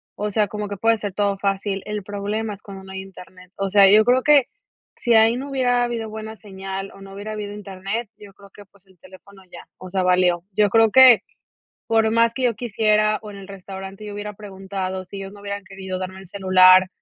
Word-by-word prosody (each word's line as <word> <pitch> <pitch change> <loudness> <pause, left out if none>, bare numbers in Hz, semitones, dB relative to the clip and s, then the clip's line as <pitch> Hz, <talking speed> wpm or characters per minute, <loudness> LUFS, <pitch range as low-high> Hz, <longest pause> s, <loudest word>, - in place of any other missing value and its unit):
o 210 0 -3
sea, 210 0 +1
como 210 0 -5
que 200 - -5
puede 225 +2 +2
ser 205 -1 -5
todo 200 0 0
fácil, 195 0 -2
el 210 -1 -4
problema 205 +2 -4
es 200 - -13
cuando 195 -1 -11
no 190 - -12
hay 190 - -5
Internet. 185 -1 -14
O 195 0 -2
sea, 200 -1 +7
yo 215 +2 +6
creo 250 +2 +3
que, 290 -3 +5 0.5
si 240 -2 +1
ahí 225 +2 +5
no 275 +2 -6
hubiera 250 -3 +1
habido 235 -2 -3
buena 220 0 -7
señal, 195 -1 -7
o, 195 - -15
no 195 0 -11
hubiera 205 +2 -7
habido 205 -1 -5
internet, 200 +2 -5
yo 205 -1 -14
creo 200 0 -17
que, 205 - -14
pues, 200 0 -25
el 190 -2 -25
teléfono 195 +2 -16
ya, - - -12
o 185 - -9
sea, 190 0 -1
valió. 180 -1 +2
Yo 210 +1 +3
creo 225 0 +4
que 260 -1 +8 0.6
por 225 -1 +3
más 230 0 +3
que 260 - -4
yo 240 -3 +2
quisiera, 215 -2 +1
o, 210 - -9
en 200 - -11
el 195 -1 -11
restaurante 195 +1 -9
yo 205 - -7
hubiera 205 +1 -6
preguntado 190 -2 -6
si 190 +2 -10
ellos 195 0 -8
no 205 - -14
hubieran 200 0 -5
querido 190 -1 -6
darme 190 0 -6
el 190 - -14
celular 185 -1 +5
200 Hz, 230 wpm, -22 LUFS, 190-215 Hz, 0.6 s, que